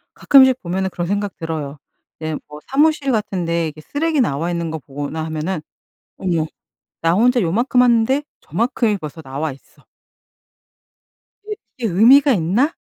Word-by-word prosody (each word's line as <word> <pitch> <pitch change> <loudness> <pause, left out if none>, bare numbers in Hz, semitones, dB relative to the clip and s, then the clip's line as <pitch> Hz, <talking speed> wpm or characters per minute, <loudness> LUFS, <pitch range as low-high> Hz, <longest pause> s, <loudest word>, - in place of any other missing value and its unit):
가끔씩 260 -2 +5
보면은 190 +2 -2
그런 175 -1 -4
생각 205 +1 -2
들어요. 155 -4 -5 0.4
이제 155 -1 -3
뭐 150 0 -10
사무실 290 0 +2
같은 200 -5 -1
데 170 0 0
이렇게 155 0 -9
쓰레기 300 - 0
나와 165 - -1
있는 170 -2 -2
거 160 - -4
보거나 145 +3 -5
하면은 160 +2 -3 0.6
'어머 170 -4 0 0.6
나 165 0 +2
혼자 245 +5 +3
요만큼 235 +9 +2
하는데 250 +4 +3 0.2
저만큼이 230 -2 0
벌써 155 -1 -8
나와 145 +3 -4
있어.' 135 - -17 1.6
'이게 425 0 -4 0.2
이게 235 -3 -1
의미가 270 +9 +6
있나?' 215 - +1
185 Hz, 320 characters per minute, -19 LUFS, 160-250 Hz, 1.6 s, 의미가